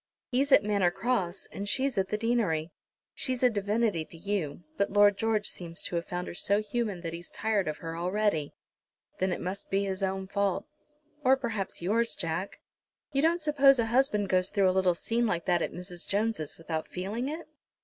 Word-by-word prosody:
He's 275 +3 +1
at 210 - +7
Manor 200 -4 +2
Cross, 195 -2 -1
and 200 +1 -4
she's 265 +2 +1
at 190 -2 +1
the 210 - 0
deanery. 210 -9 0 0.4
She's 255 -1 -1
a 250 - +6
divinity 205 -3 0
to 165 - -13
you, 175 -3 -3
but 200 +4 +1
Lord 205 0 +6
George 215 0 0
seems 170 -2 -3
to - - -3
have 170 0 -2
found 180 0 -3
her - - -5
so 200 +4 +2
human 215 -3 -2
that 165 -1 -4
he's 170 +1 -7
tired 210 -4 0
of 155 - -2
her 165 0 -6
already." 180 -3 0 0.6
"Then 185 0 +1
it - - -2
must 185 +3 -5
be 195 +1 +1
his 190 0 -3
own 190 0 -1
fault." 200 -1 0 0.6
"Or 265 0 +5
perhaps 220 -8 -3
yours, 230 +5 +1
Jack. 170 +2 -3 0.5
You 275 -1 +2
don't 335 +3 +3
suppose 280 -3 +5
a 230 - +2
husband 225 -6 +3
goes 185 0 +2
through 195 -2 +3
a - - -2
little 185 -2 +3
scene 230 +6 0
like 170 -5 -1
that 175 -2 +2
at - - -1
Mrs. 180 -1 -6
Jones' 205 -6 -1
without 160 -1 -4
feeling 210 +8 -3
it?" 320 +2 -6
200 Hz, 200 wpm, -29 LUFS, 180-230 Hz, 0.6 s, at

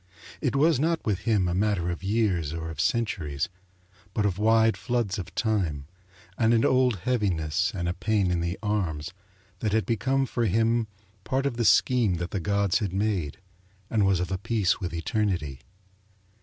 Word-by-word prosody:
It - - 0
was 150 0 +3
not 165 +2 0
with 100 -4 0
him 100 -5 +3
a 90 - -1
matter 95 -3 0
of 85 - -5
years 95 -7 0
or 80 0 -5
of 75 -1 -3
centuries, 90 - -1 0.7
but 105 - +1
of 100 -1 -1
wide 110 +1 +4
floods 120 -6 -1
of 90 - -8
time, 90 - -1 0.5
and 115 0 +4
an 115 - +3
old 125 -7 +2
heaviness 90 -7 0
and 85 -2 -2
a 85 - 0
pain 100 0 0
in 85 -1 0
the 85 +2 -2
arms 90 -6 -2 0.5
that 105 0 -1
had 110 -1 +2
become 135 +4 +1
for 120 -2 -1
him 115 +3 +2 0.4
part 135 +5 -1
of 140 -4 -1
the 115 -1 -1
scheme 105 0 +4
that 85 +1 -4
the 100 - -1
gods 100 +2 +1
had 100 -5 -3
made 95 -7 -1 0.5
and 110 -3 +2
was 95 -2 +3
of 90 +1 -3
a 95 - -1
piece 105 -2 +1
with 90 - -4
Eternity. 85 - -2
100 Hz, 180 wpm, -26 LUFS, 90-115 Hz, 0.7 s, wide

